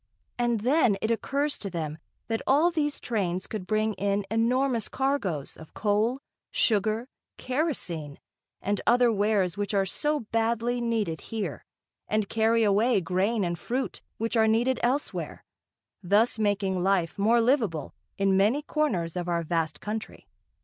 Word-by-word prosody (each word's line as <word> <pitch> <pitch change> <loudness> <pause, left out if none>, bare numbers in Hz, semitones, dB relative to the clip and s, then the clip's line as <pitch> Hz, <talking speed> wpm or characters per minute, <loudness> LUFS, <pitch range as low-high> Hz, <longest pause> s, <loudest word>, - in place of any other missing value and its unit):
And 240 -3 +1
then 245 -4 +3
it 220 - -1
occurs 280 +5 -1
to 200 - -4
them 160 -3 -4 0.3
that 225 -1 -1
all 305 +6 +4
these 295 -3 -1
trains 185 -6 -2
could 205 -4 -6
bring 215 0 +1
in 200 +1 -1
enormous 235 +1 +1
cargoes 260 - -1
of 160 - -14
coal, 220 +5 +1 0.3
sugar, 220 +2 +1 0.3
kerosene 220 - -2 0.5
and 205 0 0
other 245 -1 +5
wares 200 -3 +1
which 205 0 -2
are 195 -1 +3
so 295 +10 -1
badly 230 +2 0
needed 220 -9 -1
here, 220 -3 -5 0.4
and 215 -2 0
carry 225 +1 +2
away 210 +3 +3
grain 190 +5 0
and 170 -2 -2
fruit, 260 +2 -3 0.2
which 225 +2 -2
are 220 -1 +4
needed 240 +4 +2
elsewhere, 260 +5 -2 0.6
thus 210 +5 +2
making 200 -3 0
life 185 -2 +1
more 225 +4 +4
livable 225 - +1 0.2
in 195 -1 +2
many 215 +10 +3
corners 190 - -1
of 175 -1 -3
our 170 -1 0
vast 160 -2 -1
country. 215 +1 -6
215 Hz, 145 wpm, -27 LUFS, 190-240 Hz, 0.6 s, other